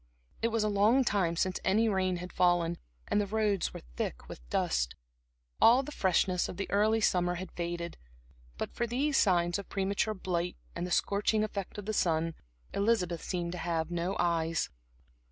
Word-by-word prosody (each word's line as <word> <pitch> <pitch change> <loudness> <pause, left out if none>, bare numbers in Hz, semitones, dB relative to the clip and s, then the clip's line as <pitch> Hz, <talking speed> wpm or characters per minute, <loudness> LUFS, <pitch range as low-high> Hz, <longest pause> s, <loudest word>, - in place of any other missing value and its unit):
It 230 - +3
was 225 -1 0
a - - +2
long 210 +6 +4
time 190 -7 +1
since 185 +2 0
any 215 +4 +3
rain 190 -3 +1
had 180 +1 -7
fallen, 175 -1 +2 0.3
and 210 - +2
the 205 - -2
roads 210 -2 +1
were - - -9
thick - - -3
with - - -9
dust. 60 +1 0 0.7
All 245 +4 +7
the 295 - -7
freshness 185 - +1
of - - -7
the 195 - -3
early 215 +2 +3
summer 180 -3 +2
had 185 0 -6
faded. 170 0 -4 0.6
But - - -4
for 235 - -1
these 275 +5 0
signs 175 -4 +3
of 200 - -9
premature 200 +2 0
blight 180 -2 -2 0.2
and 175 +1 -2
the - - -7
scorching 210 +3 +2
effect 200 -2 -4
of 205 - -6
the 215 - -2
sun, 165 -3 +1 0.4
Elizabeth 200 -5 +1
seemed 175 -2 -3
to 180 - -5
have 165 -1 -1
no 175 +3 -1
eyes. 165 - 0
185 Hz, 180 wpm, -31 LUFS, 170-210 Hz, 0.7 s, All